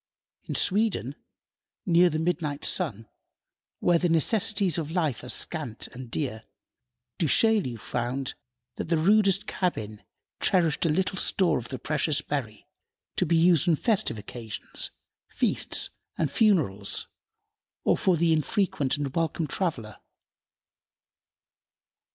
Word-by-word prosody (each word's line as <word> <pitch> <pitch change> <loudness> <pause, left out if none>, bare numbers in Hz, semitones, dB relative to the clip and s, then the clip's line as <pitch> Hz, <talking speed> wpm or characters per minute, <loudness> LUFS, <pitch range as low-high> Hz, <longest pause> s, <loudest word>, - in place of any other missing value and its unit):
In - - -5
Sweden, 205 - +1 0.7
near 175 +1 +4
the 155 - -2
midnight 155 -3 -2
sun, 115 - +2 0.7
where 175 -1 +3
the 175 - +1
necessaries 190 +1 +2
of 155 -2 -4
life 160 -8 -1
are 125 - -8
scant 145 -8 -1
and 125 -1 -10
dear, 115 -5 -3 0.8
Du 165 - +1
Chaillu 205 - +3
found 125 +5 -3 0.4
that - - -3
the 170 - +2
rudest 195 +3 +3
cabin 110 - -3 0.4
cherished 170 -3 +2
a - - 0
little 190 +5 0
store 185 -3 +2
of 120 - -9
the 130 - -5
precious 150 +3 0
berry 120 -8 -5 0.5
to - - 0
be 170 - +2
used 170 -1 +4
on 165 - +4
festive 195 - 0
occasions, 110 +1 -5 0.4
feasts - - +2 0.3
and 155 -4 -1
funerals, 140 - +1 0.8
or - - +3
for 185 -3 +1
the 165 0 +2
infrequent 155 -3 0
and 140 -2 -4
welcome 165 0 -1
traveler. 135 - -3
160 Hz, 125 wpm, -26 LUFS, 130-180 Hz, 0.8 s, near